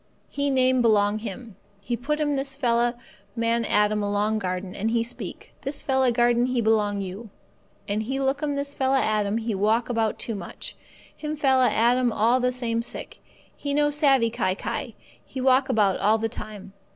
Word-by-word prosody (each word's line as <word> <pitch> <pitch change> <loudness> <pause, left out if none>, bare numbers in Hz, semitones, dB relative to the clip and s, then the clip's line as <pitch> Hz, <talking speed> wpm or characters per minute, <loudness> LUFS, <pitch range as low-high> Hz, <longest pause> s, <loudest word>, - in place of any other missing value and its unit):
He 285 0 -1
name 260 -1 +3
belong 210 -2 +3
him. 220 0 -8 0.2
He 240 +4 -3
put 300 +6 -2
him 295 -1 +1
this 270 0 -2
fella 240 -2 +1 0.4
man 230 0 +1
Adam 210 -1 +2
along 205 +1 0
garden, 185 -1 -4
and 215 +3 -1
He 230 0 +1
speak, 235 +1 -7
'This 280 +2 -4
fella 265 -2 +2
garden 240 +1 +3
he 255 -1 0
belong 210 -2 +1
you.' 195 +4 -7 0.6
And 205 +1 -1
He 265 +5 -3
look 270 +1 0
'm 290 -2 -1
this 280 0 -3
fella 265 0 +2
Adam 215 -2 +1
he 230 -1 -2
walk 215 +5 +1
about 225 -3 0
too 230 - -4
much. 200 - -7 0.4
Him 305 0 -4
fella 265 -3 +4
Adam 240 +2 +2
all 230 +4 +3
the 250 0 +1
same 235 -2 -1
sick; 235 - -7 0.4
he 285 -1 -3
no 295 0 +3
savvee 270 -6 +3
kai 185 -4 0
kai; - - -4 0.3
he 265 - -8
walk 260 +1 +3
about 205 -6 +2
all 215 +2 +3
the 225 0 -1
time. 210 -4 -9
235 Hz, 185 wpm, -25 LUFS, 215-265 Hz, 0.6 s, fella